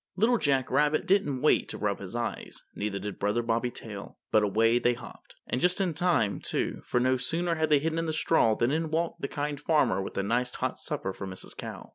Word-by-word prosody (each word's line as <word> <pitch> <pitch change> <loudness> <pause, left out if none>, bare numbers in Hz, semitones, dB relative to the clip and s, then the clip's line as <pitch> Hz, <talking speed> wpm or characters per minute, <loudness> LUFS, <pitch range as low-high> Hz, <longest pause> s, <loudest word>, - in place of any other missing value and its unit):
Little 225 +5 +3
Jack 135 -3 +1
Rabbit 150 +1 +2
didn't 150 -10 +2
wait 155 - +3
to - - -4
rub 100 -1 -1
his 100 +3 -7
eyes, 120 0 -4
neither 105 -1 -3
did 100 0 -6
Brother 105 +4 +1
Bobby 115 +1 0
Tail, 105 -4 -8
but 110 - +5
away 115 +3 +3
they 120 0 +2
hopped. 125 - -13
And 125 - -2
just 180 +2 +2
in 185 -4 +1
time, 150 - +1
too; - - -2
for 125 - +2
no 130 +1 +3
sooner 165 +7 0
had 160 -1 0
they 150 - +6
hidden 160 +3 -1
in 165 - -1
the - - 0
straw 155 -8 +3
than 120 +3 +1
in 160 +1 0
walked 165 +2 -1
the 140 - -1
Kind 145 0 -3
Farmer 150 -10 +2
with - - -6
a 100 - +1
nice 120 +4 0
hot - - -2
supper 95 - -3
for 95 - -6
Mrs. 95 0 -10
Cow. - - -8
130 Hz, 230 wpm, -28 LUFS, 110-160 Hz, -, they